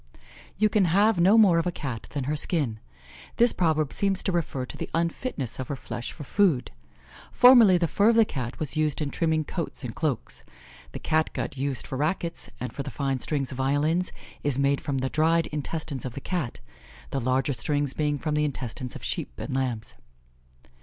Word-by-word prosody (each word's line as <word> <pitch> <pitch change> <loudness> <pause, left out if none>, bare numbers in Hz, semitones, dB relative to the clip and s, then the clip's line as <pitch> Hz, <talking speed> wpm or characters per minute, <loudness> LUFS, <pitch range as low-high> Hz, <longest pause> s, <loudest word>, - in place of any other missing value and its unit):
"You 215 +2 +4
can 210 -2 +3
have 200 +4 +3
no 190 +6 +6
more 190 -7 +6
of 165 - -1
a - - +1
Cat 130 -9 -5
than 140 -2 -3
her 145 +4 -1
skin." 145 -8 0 0.6
This 240 0 +5
proverb 155 -4 +1
seems 195 -2 +1
to - - 0
refer 155 -7 -1
to - - -8
the - - -5
unfitness 165 - -2
of 130 - -3
her 145 - -3
flesh 120 -2 -6
for - - -9
food. 155 -5 +2 0.6
Formerly 240 -7 +7
the 170 -1 +1
fur 205 +7 +3
of 230 - +4
the 225 -1 +6
Cat 125 - -5
was 150 -2 -3
used 155 -2 +1
in 145 -3 -2
trimming 160 -2 +1
coats 160 -2 -4
and 120 -3 -4
cloaks. 150 -7 -2 0.5
The - - -4
Cat 155 0 +1
gut - - -3
used 135 -2 -3
for 130 - -5
rackets, 165 +2 -2
and 125 - -5
for - - -4
the 140 - -5
fine 135 0 -2
strings 140 0 -2
of 130 - -6
violins, 150 +7 +1 0.3
is 145 -3 +1
made 140 0 +2
from 140 -2 -2
the 130 0 -1
dried 165 +1 +3
intestines 150 -2 -3
of 125 - -5
the - - -4
Cat, 135 - -3 0.5
the 135 - -1
larger 130 +3 +1
strings 145 0 -1
being 150 0 0
from 155 +2 -2
the 150 0 +2
intestines 130 -3 -4
of - - -8
sheep - - -3
and 140 - -5
lambs. 120 - -2
150 Hz, 200 wpm, -26 LUFS, 135-170 Hz, 0.6 s, Formerly